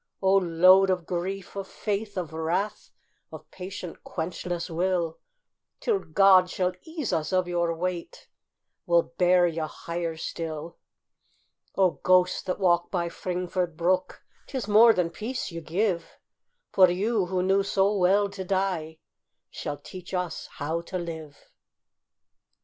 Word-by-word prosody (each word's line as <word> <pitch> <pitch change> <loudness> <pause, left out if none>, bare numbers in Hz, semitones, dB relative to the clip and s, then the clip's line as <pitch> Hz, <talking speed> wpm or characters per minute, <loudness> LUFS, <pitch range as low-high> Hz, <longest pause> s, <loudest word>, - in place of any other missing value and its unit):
O 190 0 +3
load 185 +1 +5
of 180 -2 0
grief, 185 +3 -4
of 195 -1 -4
faith, 205 0 -3
of 170 -4 -4
wrath, 180 +6 -2 0.4
Of - - -11
patient, 185 -1 -8
quenchless 175 0 -4
will, 170 -1 -1 0.6
Till 435 -4 +1
God 185 - +5
shall 180 0 0
ease 315 - -4
us 160 -2 -1
of 185 -1 +2
your 170 -1 0
weight 175 0 -4 0.6
We'll 170 -1 +4 0.2
bear 180 0 +5
you 165 -1 -1
higher 170 +1 -5
still! 160 0 -5 1.0
O 185 -3 +2
ghosts 185 0 +3
that 185 - -3
walk 175 -2 +2
by 175 -2 -1
Fringford 180 -1 -3
brook, 180 +2 0 0.2
'Tis 255 -7 -4
more 220 +3 +7
than 180 -5 0
peace 220 +5 -4
you 165 0 -6
give, 175 +1 -1 0.5
For 185 -2 +6
you, 200 +2 0
who 180 0 0
knew 195 +1 +3
so 195 +1 +1
well 195 +2 +3
to 200 -1 -7
die, 185 -4 -1 0.5
Shall 145 - -5
teach 185 +3 -8
us 180 -2 -3
how 160 +3 -2
to 185 +2 -5
live. 160 -4 -6
180 Hz, 140 wpm, -26 LUFS, 170-195 Hz, 1.0 s, more